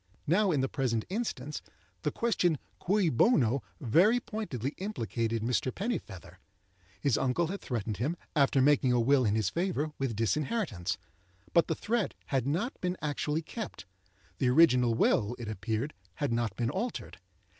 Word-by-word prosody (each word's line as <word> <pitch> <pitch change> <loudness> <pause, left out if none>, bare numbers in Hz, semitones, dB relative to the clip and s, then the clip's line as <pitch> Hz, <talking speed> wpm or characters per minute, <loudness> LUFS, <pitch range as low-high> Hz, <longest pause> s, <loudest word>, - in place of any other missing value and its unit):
Now 190 +6 +3
in 150 -6 +2
the 135 - +1
present 125 -5 -1
instance, 180 - -3 0.4
the - - 0
question 180 -9 +1 0.2
cui 195 -1 +2
bono? 135 - +3 0.2
very 175 - +4
pointedly 150 - -4
implicated 115 - -2
Mr. 125 +2 0
Pennifeather. 100 - -5 0.6
His 140 -5 +2
uncle 135 +6 +1
had 195 +2 -4
threatened 110 -4 -3
him, 150 +10 -1 0.2
after 140 -2 +4
making 140 -2 +4
a 120 - +3
will 130 +2 +4
in 105 0 +2
his 110 -1 +1
favour, 165 -4 -1
with 135 -5 -1
disinheritance. 115 - -1 0.6
But 170 - +5
the 160 - 0
threat 225 +1 -1 0.2
had 135 -2 +1
not 180 - -1
been 180 0 -1
actually 150 +1 -1
kept; 220 +7 -7 0.5
the 130 - +2
original 125 -5 +5
will, 115 0 +2
it 120 - -6
appeared, 110 +6 -2 0.2
had 145 -5 -1
not 115 -4 -1
been 120 0 -1
altered. 230 +9 -4
140 Hz, 155 wpm, -30 LUFS, 115-180 Hz, 0.6 s, But